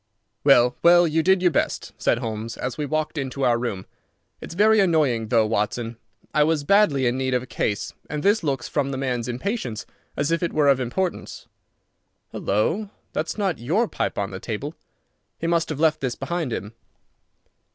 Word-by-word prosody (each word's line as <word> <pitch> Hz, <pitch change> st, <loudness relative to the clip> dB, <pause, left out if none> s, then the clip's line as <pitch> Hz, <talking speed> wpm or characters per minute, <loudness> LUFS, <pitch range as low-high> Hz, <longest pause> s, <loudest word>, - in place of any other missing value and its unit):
"Well, 125 Hz, -3 st, +5 dB
well, 175 Hz, +1 st, +6 dB
you 160 Hz, +1 st, +1 dB
did 185 Hz, +2 st, +3 dB
your 180 Hz, -, +4 dB
best," -, -, -1 dB
said -, -, +1 dB
Holmes, 115 Hz, -1 st, -5 dB
as 125 Hz, -1 st, -3 dB
we 150 Hz, +2 st, -3 dB
walked 155 Hz, +1 st, -2 dB
into 135 Hz, 0 st, -2 dB
our 120 Hz, -1 st, +3 dB
room. 105 Hz, -6 st, -3 dB, 0.6 s
"It's -, -, -8 dB
very 215 Hz, +3 st, +5 dB
annoying, 150 Hz, -, +2 dB
though, 115 Hz, -1 st, +3 dB
Watson. 115 Hz, +2 st, -1 dB, 0.4 s
I 150 Hz, -, +4 dB
was 155 Hz, -1 st, +1 dB
badly 150 Hz, -7 st, +3 dB
in 125 Hz, +2 st, +1 dB
need 130 Hz, -1 st, 0 dB
of 125 Hz, -, 0 dB
a -, -, -8 dB
case, 105 Hz, -4 st, -2 dB, 0.2 s
and 150 Hz, -1 st, -3 dB
this 205 Hz, 0 st, +3 dB
looks, 140 Hz, -3 st, -1 dB
from 140 Hz, -2 st, -1 dB
the 135 Hz, -, -3 dB
man's 125 Hz, -3 st, -2 dB
impatience, 125 Hz, -, -3 dB, 0.3 s
as 145 Hz, +3 st, 0 dB
if 165 Hz, -, +1 dB
it 170 Hz, -, -1 dB
were 150 Hz, -2 st, +3 dB
of 135 Hz, -1 st, +4 dB
importance. 170 Hz, +9 st, -3 dB, 0.8 s
Halloa! 165 Hz, -, 0 dB, 0.2 s
That's 155 Hz, +6 st, -2 dB
not 195 Hz, -6 st, -1 dB
your 175 Hz, -, +1 dB
pipe -, -, -3 dB
on 100 Hz, 0 st, -2 dB
the 95 Hz, -, -6 dB
table. 120 Hz, +10 st, -5 dB, 0.6 s
He -, -, -5 dB
must 170 Hz, -1 st, +1 dB
have 150 Hz, -3 st, -4 dB
left 155 Hz, -1 st, +2 dB
his 130 Hz, -3 st, -2 dB
behind 160 Hz, 0 st, -3 dB
him. 105 Hz, 0 st, -5 dB
140 Hz, 185 wpm, -23 LUFS, 120-165 Hz, 0.8 s, well